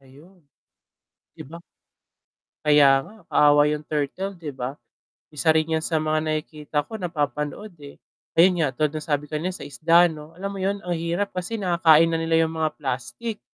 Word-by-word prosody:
Ayun. 150 +8 -19 0.9
'Di - - -9
ba? 170 +3 -10 1.0
Kaya 145 -2 +6
nga, 215 - -15 0.2
kaawa 145 0 +5
yung 150 0 -4
turtle 170 +6 -3
'di 155 -4 -7
ba? 130 +1 -5 0.6
Isa 150 +2 -2
rin 160 0 +1
yan 160 - -6
sa 165 - 0
mga 155 0 +1
nakikita 155 -1 -3
ko, 220 - -7
napapanood, 150 - -3
eh. 140 -1 -11 0.4
Ayun 175 0 +5
nga 150 - +2
tulad 150 +3 +1
nung 155 - -4
sabi 145 -2 0
kanina 160 +4 -2
sa - - -8
isda 165 +6 +4
'no, 155 +1 -11
alam 195 +2 -4
mo 195 - -7
'yun 195 +2 -1
ang 180 - -2
hirap 170 +5 -2
kasi 180 +5 -3
nakakain 165 -3 +5
na 165 - 0
nila 165 0 +2
yung 160 - -7
mga 155 -1 0
plastik 130 - -4
155 Hz, 175 wpm, -23 LUFS, 145-175 Hz, 1.0 s, Kaya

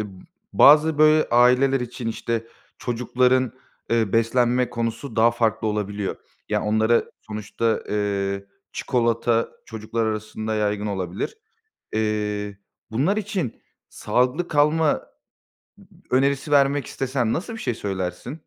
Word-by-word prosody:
ımm, 95 -3 -8 0.3
bazı, 150 +1 +6
böyle, 155 0 +5
aileler 125 +3 +4
için, 120 -1 -5
işte, 115 0 -3 0.3
çocukların, 125 +1 +1 0.4
ııı, 110 -4 +1
beslenme 120 +2 +2
konusu 115 +1 -4
daha 115 +1 +5
farklı 115 -1 0
olabiliyor. 105 -1 -3 0.3
Ya, - - 0
onlara 110 +2 +2 0.2
Sonuçta, 110 +2 -1
eee, 100 -1 -1 0.3
çikolata 115 -1 +1 0.2
çocuklar 110 +1 -3
arasında 110 0 -3
yaygın 105 -1 -1
olabilir. 95 - -4 0.6
Eee, 105 -2 -2 0.3
bunlar 150 - +1
için 195 - -3 0.3
sağlıklı 130 +8 0
kalma 150 +1 +3
ı - - +3
ı - - -8 1.1
önerisi 135 +3 +1
vermek 140 0 +3
istesen 125 -4 -1
nasıl 195 +7 -3
bir 225 - -7
şey 125 - -2
söylersin? 95 - -4
115 Hz, 115 wpm, -23 LUFS, 105-135 Hz, 1.1 s, bazı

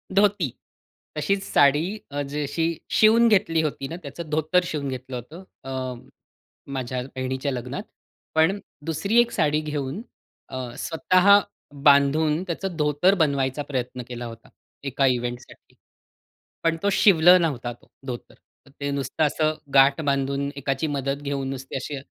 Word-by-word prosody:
धोती, 200 -7 +3 0.7
तशीच 195 +6 0
साडी 145 +1 +4 0.3
अ, 145 - -2
जशी 150 +3 -1 0.3
शिवून 225 +2 +6
घेतली 165 -6 +3
होती 140 -3 -3
ना, 165 - -6
त्याचं 155 +3 -7
धोतर 160 +4 +2
शिवून 150 -5 -3
घेतलं 130 0 -6
होतं. 150 - -8 0.2
अ, 130 -1 -4 0.8
माझ्या 130 -1 -3
बहिणीच्या 130 +2 -2
लग्नात. 125 - -5 0.5
पण 165 +6 +3 0.3
दुसरी 195 +8 +1
एक 235 0 -1
साडी 150 -3 +1
घेऊन 150 +3 -4 0.5
अ, - - -6 0.2
स्वतः 185 +4 +4 0.4
बांधून 150 +3 +4
त्याचं 180 +1 -3
धोतर 150 +5 +3
बनवायचा 140 -4 +1
प्रयत्न 125 -2 -3
केला 120 -1 -6
होता, 115 -1 -10 0.3
एका 140 0 0
इव्हेंटसाठी. 125 0 -4 0.9
पण 165 0 +2
तो 200 - +3
शिवलं 180 -2 +6
नव्हता 130 -7 -1
तो, 120 - -23 0.2
धोतर. 120 -2 -7 0.3
ते 140 +1 -5
नुसतं 140 +2 -1
असं 155 +1 +1 0.2
गाठ 135 +3 +5
बांधून, 140 -1 0
एकाची 135 +2 -2
मदत 140 0 -2
घेऊन, 140 -2 -3
नुसती 135 0 -6
अशी 135 +2 -4
145 Hz, 135 wpm, -24 LUFS, 135-165 Hz, 0.9 s, शिवून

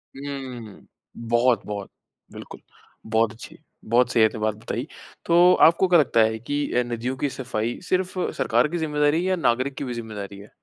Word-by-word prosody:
हम्म। 130 -6 -8 0.4
बहुत, 120 +1 +2
बहुत। 100 -2 -6 0.4
बिल्कुल। - - -11 0.4
बहुत 110 0 +1
अच्छी। 110 - -12 0.3
बहुत 120 +2 +2
सही 115 - +4
अपने 110 0 +1
बात 110 0 -1
बताई। 110 - -5 0.4
तो 175 +2 +6
आपको 170 +3 +2
क्या 175 -2 +5
लगता 125 -5 +2
है 110 0 +1
कि 145 +5 -2
अ, 125 - +2
नदियों 120 +2 -4
की 145 - -1
सफाई 120 -3 -4
सिर्फ 185 0 0 0.2
सरकार 150 - +2
की 175 - -4
जिम्मेदारी 150 -1 +1
है, - - 0
या 185 - +2
नागरिक 130 -3 0
की - - -4
भी 125 -3 -4
ज़िम्मेदारी 105 -4 -7
है? 100 - -13
125 Hz, 180 wpm, -24 LUFS, 110-145 Hz, 0.4 s, तो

